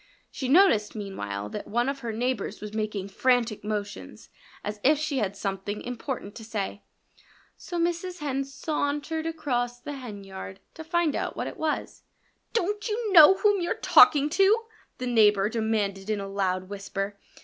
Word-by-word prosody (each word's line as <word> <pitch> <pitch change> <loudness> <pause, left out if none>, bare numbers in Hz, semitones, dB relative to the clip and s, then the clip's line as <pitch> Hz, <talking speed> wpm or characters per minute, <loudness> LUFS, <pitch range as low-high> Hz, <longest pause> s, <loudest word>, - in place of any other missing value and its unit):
She 260 - -4
noticed 265 - +4
meanwhile 105 - -5
that - - -6
one 240 +3 0
of 275 0 -2
her 235 -3 -4
neighbors 225 -2 -2
was 210 0 -7
making 210 -3 -3
frantic 240 0 +1
motions, 205 -1 -5 0.3
as 210 0 -4
if 295 +3 +5
she 300 -2 -1
had 200 -1 -2
something 195 +1 -3
important 245 -3 -5
to 225 - -9
say. 205 -2 -4 0.7
So 350 - -6
Mrs. 345 +1 -1
Hen 275 -3 -2
sauntered 295 +3 -2
across 245 -7 -2
the 290 +4 -6
henyard 200 -7 -8
to 320 - -8
find 335 -2 +1
out - - -3
what - - -2
it - - -6
was. 315 -1 -2 0.5
"Don't 415 +1 -1
you 430 -1 -2
know 335 +2 +10
whom 410 -1 +2
you're 345 - -1
talking 290 -1 +6
to?" 395 +5 +4 0.4
the 255 - -4
neighbor 210 -4 +4
demanded 215 -3 -1
in 215 -1 0
a 195 - -5
loud 185 -2 -1
whisper. 200 0 -5
240 Hz, 160 wpm, -27 LUFS, 205-305 Hz, 0.7 s, know